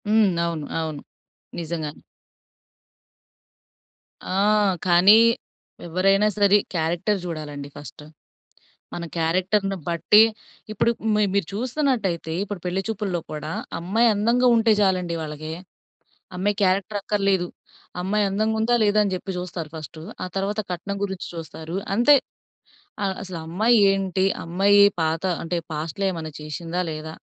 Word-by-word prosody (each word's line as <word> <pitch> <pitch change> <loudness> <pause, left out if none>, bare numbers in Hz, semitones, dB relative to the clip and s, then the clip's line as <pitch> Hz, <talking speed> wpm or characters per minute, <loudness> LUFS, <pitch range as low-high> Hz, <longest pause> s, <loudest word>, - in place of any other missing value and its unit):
హ్మ్. 215 -1 +4 0.2
అవును, 165 -3 -3
అవును. 155 -3 -4 0.6
నిజంగానే. 160 -2 -5 2.3
ఆ! - - -2 0.5
కానీ 185 +5 +7 0.7
ఎవరైనా 195 +4 +3
సరే. 205 0 +5 0.2
క్యారెక్టర్ 175 +5 0
చూడాలండి 150 -4 -6
ఫర్స్ట్. 145 0 -10 0.9
మన 170 - -5
క్యారెక్టర్‌ని 185 +4 +1
బట్టి 170 +5 +5 0.5
ఇప్పుడు 215 +2 +2 0.2
మి 210 - +2
మీరు 200 -5 +1
చూస్తున్నట్టయితే 225 - -1
ఇప్పుడు 205 -2 -6
పెళ్లి 180 +2 -1
చూపుల్లో 205 -5 -2
కూడా 150 +1 -5 0.3
అమ్మాయి 210 +8 +2
అందంగా 235 +5 +2
ఉంటే 225 0 +3
చాలండి 180 -3 +1
వాళ్ళకి. 155 0 -6 0.9
అమ్మాయి 200 +3 0
క్యారెక్టర్ 195 +2 +1
అక్కర్లేదు. 195 -4 +1 0.5
అమ్మాయి 205 +3 +1
అందంగా 215 +3 0
ఉందా 235 +2 +2
లేదా, 210 0 +3
అని 200 - -1
చెప్పి 185 +2 -5
జూస్తారు 180 -3 -5
ఫర్స్ట్. 155 0 -8 0.2
ఆ - - -3
తర్వాత 200 +2 -1
కట్నం 200 +3 -4
గురించి 190 -2 -5
చూస్తారు. 165 +1 -7 0.2
అంతే 240 +7 +6 0.9
ఆహ్, 190 -1 -1
అసలు 185 -3 -6
అమ్మాయి 215 +9 +3
ఏంటి? 190 -1 0 0.2
అమ్మాయి 195 +4 +4 0.2
పాత 160 +1 0 0.2
అంటే 175 +1 -2
పాస్ట్‌లో 160 +5 -3
ఏమైనా 160 -3 -6
చేశిందా 165 +4 -4
లేదా? 155 0 -6
185 Hz, 120 wpm, -23 LUFS, 165-205 Hz, 2.3 s, కానీ